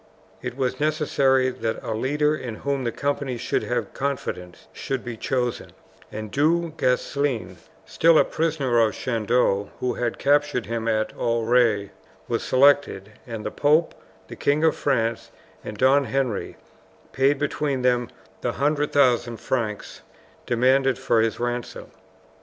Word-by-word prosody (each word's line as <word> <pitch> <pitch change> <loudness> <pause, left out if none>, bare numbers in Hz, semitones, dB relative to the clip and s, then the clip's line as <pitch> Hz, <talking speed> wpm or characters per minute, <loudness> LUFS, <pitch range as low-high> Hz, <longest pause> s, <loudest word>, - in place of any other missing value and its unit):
It 125 0 -6
was 130 +1 -1
necessary 140 -4 +2
that 110 -2 -3
a - - -3
leader 150 +6 +1
in 120 -7 -6
whom 140 +1 -2
the 120 - 0
companies 140 -3 -2
should 125 - 0
have 120 - -3
confidence 125 -10 -4
should 135 -2 -4
be 120 -1 -5
chosen, 125 +1 -2 0.4
and 110 0 -6
Du 165 +3 +1
Guesclin, 130 -2 -1 0.3
still 165 0 +4
a - - +5
prisoner 150 -7 0
of 110 -2 +2
Chandos, 115 -4 0
who 125 -1 -1
had 120 -1 -2
captured 145 -3 +1
him 115 -1 -3
at 110 -1 0
Auray, 115 -3 +1 0.4
was - - -1
selected, 130 -7 +3 0.2
and 115 -3 -6
the 105 - -3
pope, 155 +3 +2 0.3
the - - -9
King 145 +2 +1
of 160 - +3
France, 115 -5 -1 0.3
and 105 - -7
Don 135 +3 +4
Henry, 125 -3 -2 0.5
paid 135 +2 +2
between 140 -2 -1
them 125 -1 +2 0.3
the - - -1
100,000 140 -5 +1
francs 110 -5 -3 0.5
demanded 130 +2 +3
for 115 - +2
his 115 0 -1
ransom. 120 0 -4
125 Hz, 140 wpm, -24 LUFS, 115-140 Hz, 0.5 s, a